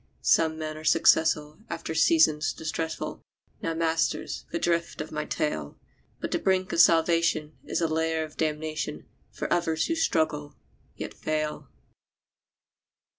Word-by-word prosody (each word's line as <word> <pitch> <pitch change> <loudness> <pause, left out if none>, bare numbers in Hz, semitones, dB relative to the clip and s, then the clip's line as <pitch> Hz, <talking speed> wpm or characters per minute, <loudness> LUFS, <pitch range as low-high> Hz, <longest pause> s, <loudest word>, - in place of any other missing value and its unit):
Some 160 - +3
men 155 -1 -4
are 155 - -9
successful 155 -1 +3
after 165 -1 -4
seasons 155 -1 +4
distressful 160 0 -4 0.4
[Now, 165 - -2
masters, 165 0 -1
the - - -1
drift 170 0 -1
of 150 - -5
my 150 0 -3
tale]; 75 - -2 0.4
But - - -4
the - - +1
brink 185 -1 +1
of - - 0
salvation 165 -2 +4
is - - -2
a 165 - +2
lair 160 0 0
of 155 -1 -9
damnation 155 0 -3 0.2
For - - -2
others 165 -2 +1
who 330 - 0
struggle, 155 - 0 0.4
yet - - -6
fail. 155 -1 -3
160 Hz, 135 wpm, -27 LUFS, 155-165 Hz, 0.4 s, seasons